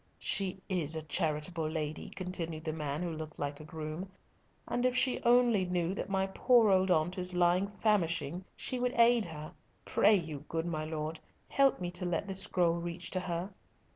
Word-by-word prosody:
"She 195 -2 -1
is 165 -5 0
a 160 - -4
charitable 155 0 -1
lady," 155 -1 -4
continued 170 -4 -4
the 160 -1 -2
man, 150 +1 -3
who 175 - -2
looked 155 -1 -7
like 145 0 -4
a - - -9
groom, 155 +4 -6 0.6
"and 245 - -1
if 250 -1 +2
she 255 0 +2
only 240 -4 +4
knew 180 -1 -1
that 200 - -4
my 190 0 +1
poor 225 +2 +4
old 190 0 +3
aunt 180 +2 +1
is 180 0 +2
lying 180 +2 +3
famishing, 185 -5 0
she 255 - -2
would 250 0 0
aid 235 -1 +5
her. 155 0 -8 0.3
Pray 210 +2 +4
you, 155 -6 -4
good 165 0 -2
my 155 -3 -2
lord, 155 0 -4 0.3
help 275 -1 +3
me 175 -1 -3
to 180 +1 -2
let 175 +2 -1
this 190 -1 +4
scroll 170 -3 +1
reach 175 +1 -5
to 185 - 0
her." 180 +2 -4
175 Hz, 190 wpm, -32 LUFS, 160-195 Hz, 0.6 s, aid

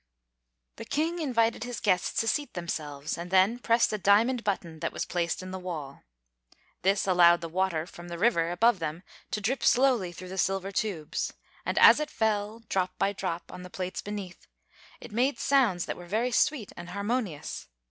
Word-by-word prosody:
The - - -7
King 330 +4 -1
invited 230 -7 +1
his 245 -1 -5
guests 185 -4 +1
to 225 - -3
seat 290 +2 -1
themselves, 155 -4 -4
and 175 +1 -6
then 190 +6 +4
pressed 230 -2 +2
a 210 - -1
diamond 230 +6 +3
button 175 -6 -3
that - - -2
was - - -3
placed 170 0 -2
in 185 - -7
the 190 - -5
wall. 155 -7 -6 0.8
This 195 +2 +2
allowed 175 -2 +5
the 165 - -4
water 170 -2 0
from 175 -1 -11
the 170 0 -6
river 170 -5 +2
above 200 +4 +3
them 160 +2 -4 0.3
to - - -2
drip 235 +5 -1
slowly 245 -8 +3
through 180 +1 -10
the 190 +1 -5
silver 195 +1 0
tubes; 185 -7 -2 0.3
and - - -1
as - - +8
it 300 - -2
fell, 220 0 -1
drop 185 -2 -1
by 200 - +1
drop, 180 -3 -4
on 180 - -8
the 180 - -9
plates 185 0 -4
beneath, 200 -3 -7 0.5
it - - -11
made 255 +6 +1
sounds 240 -11 +2
that - - -4
were 175 - -10
very 225 +7 0
sweet 245 -3 +1
and 175 - -9
harmonious. 200 - -3
190 Hz, 190 wpm, -28 LUFS, 175-230 Hz, 0.8 s, as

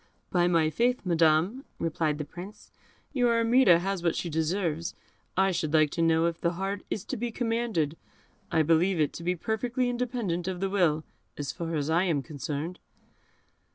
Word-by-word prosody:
"By 175 -1 +3
my 165 -3 +3
faith, 245 +4 +1
Madam," 170 - +3
replied 155 -2 -1
the 150 - -4
Prince, 180 +7 -11 0.4
"your 245 -4 +3
Armida 230 -5 +5
has 190 +1 -2
what 170 -1 +1
she 170 - -3
deserves. 165 0 -1 0.4
I 190 0 +4
should 160 -3 -1
like 155 -2 +4
to 165 - -2
know 165 0 +3
if 170 -1 -2
the 170 0 +1
heart 195 +3 -3
is 200 - -3
to - - -3
be 240 +2 -2
commanded; 225 - -1 0.6
I 160 - +3
believe 165 +3 +3
it 150 - +1
to 170 - -7
be 180 +1 0
perfectly 240 +6 -1
independent 235 -8 -2
of 185 -1 -3
the 195 0 -1
will, 165 -6 +2 0.3
as 145 -3 -3
far 165 -1 -4
as 145 -2 -1
I 170 +3 +3
am 155 -6 0
concerned." 150 +3 -5
175 Hz, 180 wpm, -28 LUFS, 160-205 Hz, 0.6 s, Armida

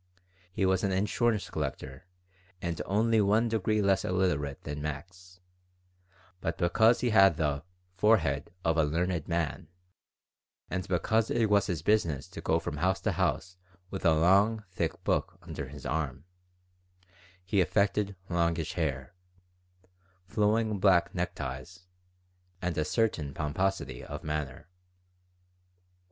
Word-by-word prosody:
He 95 +1 0
was 95 -1 +2
an 100 - +1
insurance 105 +3 0
collector 65 +7 -5 0.5
and 85 -1 -3
only 110 +3 +3
one 105 +4 +3
degree 110 -1 +1
less 100 -1 +2
illiterate 80 -7 -1
than 75 0 -5
Max; 90 +5 -7 1.0
but 80 -1 -3
because 110 +7 +4
he 120 -1 +1
had 95 -6 +6
the 75 -2 0 0.3
"forehead 90 -8 +2
of 80 0 +2
a 80 - +4
learned 85 +2 -1
man," 85 -5 -2 1.0
and 95 0 -2
because 110 +5 +1
it 115 -3 +1
was 100 -1 +4
his 85 -5 -3
business 85 -9 +1
to 85 -2 -8
go 80 - +2
from 80 -3 -4
house 95 +4 +1
to 110 - 0
house 90 0 -1 0.3
with 95 - -5
a 85 -3 +5
long, 100 +7 +4
thick 85 -3 -3
book - - 0
under 70 - -6
his 75 +1 -11
arm, 75 -2 -2 1.2
he 95 +1 +2
affected 100 +2 +1
longish 85 -1 0
hair, 80 -3 -2 1.1
flowing 105 +1 +1
black 95 -3 +4
neckties, 85 0 -5 0.7
and 90 -2 -2
a 80 - +1
certain 75 - -1
pomposity 95 +6 -2
of - - -7
manner. 75 -2 -4
90 Hz, 130 wpm, -29 LUFS, 80-100 Hz, 1.2 s, had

